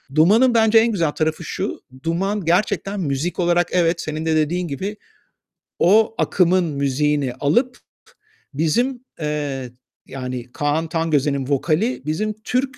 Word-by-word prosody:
Duman'ın 220 +11 +5
bence 225 0 +4
en 230 +1 +2
güzel 165 -7 0
tarafı 160 +2 -2
şu, - - -4 0.2
Duman 190 +3 -1
gerçekten 195 +2 0
müzik 155 +3 -2
olarak 175 0 +2
evet, 170 -1 +1
senin 155 +1 -4
de 160 -1 +1
dediğin 170 +3 0
gibi, 195 +9 -4 0.8
o 220 +5 +4
akımın 180 0 +2
müziğini 140 -2 0
alıp 240 - +2
p - - -21 0.7
bizim, 240 - 0 0.2
eee, 145 -4 -3 0.4
yani 125 -2 -6
Kaan 150 +3 -1
Tangöze'nin 145 -5 0
vokali 165 - 0
bizim 215 +8 -1
Türk, 260 +2 -1
165 Hz, 130 wpm, -21 LUFS, 150-205 Hz, 0.8 s, Duman'ın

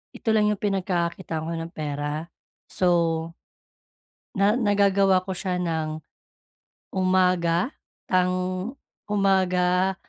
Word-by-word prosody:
ito - - -3
lang 210 -1 +3
yung 210 - -3
pinagkakakitaan 180 -4 -1
ko 170 - -3
ng 165 0 -5
pera. 150 0 -4 0.4
So 185 - 0 1.5
na 200 +2 +3
nagagawa 200 -4 +3
ko 190 - -3
siya 180 0 -2
nang 160 -3 -2 0.9
umaga, 185 0 +2 0.4
tang 180 0 +3 0.7
umaga, 190 -2 +2
185 Hz, 95 wpm, -25 LUFS, 170-195 Hz, 1.5 s, lang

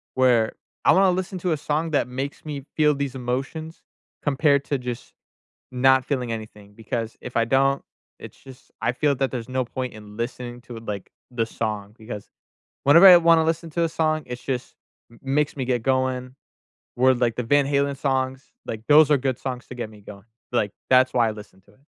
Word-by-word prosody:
Where 125 -4 +3 0.3
I - - +6
wanna 190 -1 +5
listen 185 +1 -3
to 180 0 -1
a 155 - +1
song 155 +3 -2
that 145 -5 +1
makes 135 +3 -5
me 145 -3 -6
feel 150 -1 +3
these 140 -1 -3
emotions 135 +6 -4 0.4
compared 140 0 +2
to 140 - -1
just 125 -1 -6 0.6
not 130 +1 +4
feeling 125 -5 -2
anything, 105 -2 -8
because 115 +1 -4
if 125 - -9
I 115 - +3
don't, 135 +3 +2 0.4
it's - - -11
just 130 -1 -15
I 115 - +1
feel 145 +3 +1
that 135 0 -1
there's 125 -1 -5
no 130 0 -1
point 125 +1 -5
in 105 -1 -12
listening 120 0 -5
to 120 -1 -10
it, 115 - -11
like, 100 -2 -6 0.2
the 115 -2 0
song, 105 -2 -4
because 110 -2 -8 0.5
whenever 165 +7 +8
I 180 -2 +11
wanna 165 -1 +5
listen 165 +1 -1
to 170 +2 0
a 165 - +1
song, 155 -1 0
it 125 0 -6
just 125 -1 -4 0.4
m 115 - -18
makes 145 +2 0
me 130 - -2
get 125 -2 0
going. 130 0 0 0.6
Word 130 0 +4
like 120 -2 +2
the 125 - -2
Van 145 +4 +3
Halen 140 0 0
songs, 130 -1 -2
like, 110 -1 -6
those 150 0 +7
are 145 - +6
good 130 -2 -2
songs 125 -2 -5
to 125 - -9
get 120 -3 -5
me 105 -1 -15
going, 100 -1 -12 0.3
like, 105 -4 0 0.2
that's 130 0 +5
why 120 -2 +3
I - - -2
listen 105 -3 -12
to 100 - -25
it. - - -28
130 Hz, 205 wpm, -24 LUFS, 120-145 Hz, 0.6 s, I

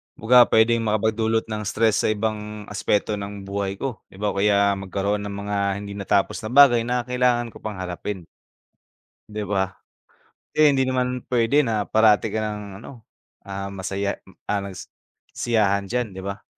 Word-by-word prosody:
Kumbaga 120 +2 +6
pwedeng 115 +1 +4
makapag-dulot 110 +1 +1
ng 105 0 -3
stress 110 0 +2
sa - - +3
ibang 105 0 -2
aspeto 105 0 0
ng 100 0 -7
buhay 100 0 -3
ko, 125 +2 -4
'di - - -18
ba? 105 - +1
O - - -7
kaya 100 0 +4
magkaroon 100 +2 -2
ng 100 - -6
mga 105 0 -3 0.3
hindi 100 0 -7
natapos 100 0 0
na - - -3
bagay 130 -4 +7
na 125 0 0
kailangan 125 -2 +1
ko - - -12
pang 110 -1 -5
harapin. 90 0 -5 1.0
'Di 105 0 -4
ba? 95 -1 -1 0.8
Eh, 155 -1 +5
hindi 135 -2 +3
naman 125 -1 -1
pwede 125 +5 +3
na 110 -6 -1
parati 110 0 +4
kang 105 -2 -4
ano, 120 -5 -12 0.4
ah, 100 0 -5
masaya, 100 +1 -3 0.2
ah, 105 - -1
nagsisiyahan 100 +2 -2
diyan, 125 +1 -1
'di 95 - -9
ba? 100 +1 -6
105 Hz, 160 wpm, -23 LUFS, 100-115 Hz, 1.0 s, bagay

